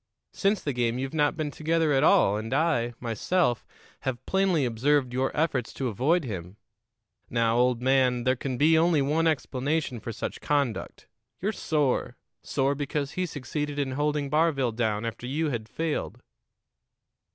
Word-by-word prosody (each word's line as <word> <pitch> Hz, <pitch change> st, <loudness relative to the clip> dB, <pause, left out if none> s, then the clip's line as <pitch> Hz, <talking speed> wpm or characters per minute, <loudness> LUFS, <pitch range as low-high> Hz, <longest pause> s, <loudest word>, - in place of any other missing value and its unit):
Since 200 Hz, 0 st, +1 dB
the 145 Hz, -, -1 dB
game 120 Hz, -1 st, 0 dB
you've 135 Hz, +2 st, -4 dB
not 150 Hz, -2 st, +1 dB
been 155 Hz, -2 st, -2 dB
together 160 Hz, 0 st, +1 dB
at 135 Hz, +1 st, +3 dB
all, 160 Hz, -, +5 dB
and 110 Hz, +2 st, -4 dB
I, 130 Hz, -7 st, +1 dB
myself, 120 Hz, -, 0 dB, 0.4 s
have 130 Hz, -2 st, -4 dB
plainly 190 Hz, -7 st, +2 dB
observed 125 Hz, +2 st, +1 dB
your 130 Hz, +1 st, +1 dB
efforts 145 Hz, -6 st, 0 dB
to 130 Hz, -2 st, -2 dB
avoid 145 Hz, -, +1 dB
him. 95 Hz, -5 st, -6 dB, 0.7 s
Now, 115 Hz, -1 st, +1 dB
old 125 Hz, -1 st, +2 dB
man, 130 Hz, -2 st, +3 dB
there 130 Hz, +1 st, +2 dB
can 130 Hz, 0 st, -4 dB, 0.2 s
only 165 Hz, -2 st, +3 dB
be 135 Hz, -, 0 dB
one 165 Hz, +3 st, +2 dB
explanation 145 Hz, -2 st, -1 dB
for 115 Hz, -, -6 dB
such -, -, -5 dB
conduct: 140 Hz, -9 st, -1 dB, 0.3 s
you're 200 Hz, +4 st, 0 dB
sore 145 Hz, -, 0 dB, 0.2 s
sore 135 Hz, 0 st, 0 dB
because 145 Hz, 0 st, -3 dB
he 185 Hz, 0 st, -2 dB
succeeded 145 Hz, 0 st, -4 dB
in 140 Hz, -2 st, -1 dB
holding 145 Hz, +1 st, 0 dB
Barville 150 Hz, -5 st, +2 dB
down 110 Hz, -1 st, -1 dB
after 115 Hz, +2 st, -5 dB
you 150 Hz, +3 st, -1 dB
had 110 Hz, -3 st, -4 dB
failed." 160 Hz, -2 st, -3 dB
135 Hz, 160 wpm, -27 LUFS, 120-155 Hz, 0.7 s, all